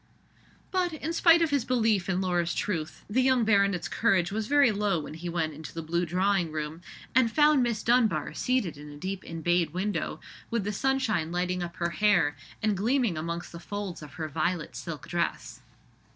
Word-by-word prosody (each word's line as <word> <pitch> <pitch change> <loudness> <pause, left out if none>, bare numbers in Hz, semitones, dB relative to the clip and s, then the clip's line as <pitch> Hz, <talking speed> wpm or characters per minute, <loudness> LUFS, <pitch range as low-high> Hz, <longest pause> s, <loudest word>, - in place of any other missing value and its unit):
But, 360 -3 0
in 315 +1 -4
spite 335 -1 +6
of 320 - 0
his 280 -4 +2
belief 220 -7 +1
in 185 0 +1
Laura's 175 -2 0
truth, 165 -6 -3
the 235 +6 +2
young 255 -3 +3
baronet's 200 -4 +2
courage 195 -5 +2
was 215 +1 -2
very 285 -3 +5
low 205 -4 0
when 150 - -8
he 170 +2 -6
went 165 -2 -1
into 155 +2 -9
the 165 - -4
blue 170 +2 -1
drawing 185 0 +1
room, 155 +1 -4 0.3
and 250 -3 +4
found 300 -1 +5
Miss 235 -3 0
Dunbar 235 -2 +2
seated 235 - -1
in 150 0 -10
a 145 - -10
deep 190 +4 -4
embayed 165 -1 0
window, 190 -3 -2 0.3
with 230 -3 -1
the 210 +2 -2
sunshine 220 -9 0
lighting 180 +1 -1
up 170 -1 -5
her 170 0 -1
hair 175 -7 +3 0.3
and 215 -2 +2
gleaming 230 0 +1
amongst 170 +2 -4
the 170 - -8
folds 200 -1 -5
of 150 - -10
her 160 -3 -4
violet 165 +2 -2
silk 165 -4 -6
dress. 175 -1 -3
190 Hz, 190 wpm, -28 LUFS, 170-230 Hz, 0.3 s, spite